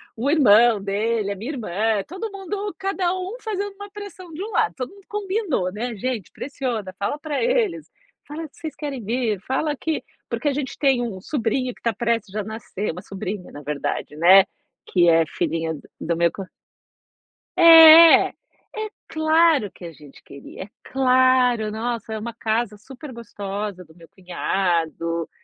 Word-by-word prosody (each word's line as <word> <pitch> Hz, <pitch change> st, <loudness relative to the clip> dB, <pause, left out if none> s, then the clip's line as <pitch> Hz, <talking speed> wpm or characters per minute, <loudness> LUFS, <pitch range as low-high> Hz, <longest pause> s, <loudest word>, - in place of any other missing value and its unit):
o 250 Hz, +5 st, -1 dB
irmão 235 Hz, -7 st, +5 dB
dele, 205 Hz, +1 st, -1 dB
a -, -, -3 dB
minha 230 Hz, +10 st, -5 dB
irmã, 215 Hz, -, -1 dB
todo 380 Hz, +6 st, -6 dB
mundo 395 Hz, +1 st, -5 dB
cada 385 Hz, -2 st, -1 dB
um 370 Hz, +5 st, -5 dB
fazendo 405 Hz, -2 st, -3 dB
uma 405 Hz, +1 st, -9 dB
pressão 400 Hz, -4 st, -10 dB
de 335 Hz, +5 st, -5 dB
um 440 Hz, -, -6 dB
lado, 440 Hz, -1 st, +1 dB
todo 255 Hz, -1 st, -5 dB
mundo 400 Hz, -1 st, -18 dB
combinou, 390 Hz, -, -2 dB
né: 230 Hz, +3 st, -4 dB
"Gente, 230 Hz, -2 st, -4 dB
pressiona, 245 Hz, -9 st, -4 dB
fala 200 Hz, +9 st, -2 dB
para 295 Hz, +2 st, -3 dB
eles, 445 Hz, -10 st, 0 dB, 0.4 s
fala 315 Hz, +2 st, -6 dB
que 290 Hz, -, -28 dB
vocês 315 Hz, -2 st, -7 dB
querem 275 Hz, -6 st, -5 dB
vir, 225 Hz, -2 st, -1 dB
fala 290 Hz, +6 st, -1 dB
que" 320 Hz, +3 st, -3 dB, 0.3 s
Porque 305 Hz, -, -2 dB
a 285 Hz, -, +2 dB
gente 275 Hz, -1 st, -4 dB
tem 270 Hz, -4 st, +3 dB
um 225 Hz, -6 st, -4 dB
sobrinho 250 Hz, +2 st, -2 dB
que -, -, -23 dB
está 230 Hz, -1 st, 0 dB
prestes 230 Hz, -3 st, -1 dB
a 210 Hz, -, -1 dB
nascer, 215 Hz, -2 st, -5 dB
uma 180 Hz, -, -8 dB
sobrinha, 195 Hz, 0 st, -6 dB
na 145 Hz, -, -9 dB
verdade, 150 Hz, 0 st, -4 dB
né, 185 Hz, +5 st, +7 dB, 0.4 s
que 175 Hz, -2 st, +3 dB
é 165 Hz, 0 st, +4 dB
filhinha 160 Hz, +1 st, -2 dB
do 150 Hz, -, -9 dB, 0.2 s
do 170 Hz, -, -1 dB
meu 170 Hz, 0 st, +2 dB
co 195 Hz, -, -7 dB, 1.1 s
É, 330 Hz, -1 st, +9 dB
é -, -, -19 dB, 0.7 s
claro 315 Hz, -, +3 dB
que -, -, -16 dB
a 170 Hz, -, -7 dB
gente 150 Hz, -3 st, -16 dB
queria, 140 Hz, +6 st, -10 dB
é 205 Hz, -, -14 dB
claro, 255 Hz, -3 st, +3 dB
nossa, 225 Hz, 0 st, -4 dB
é 220 Hz, -, -3 dB
uma 235 Hz, +2 st, -6 dB
casa 220 Hz, -1 st, -2 dB
super 265 Hz, +6 st, -11 dB
gostosa 205 Hz, -4 st, -6 dB
do 160 Hz, -2 st, -20 dB
meu 165 Hz, -1 st, -16 dB
cunhado, 170 Hz, -3 st, -2 dB
235 Hz, 170 wpm, -22 LUFS, 195-315 Hz, 1.1 s, É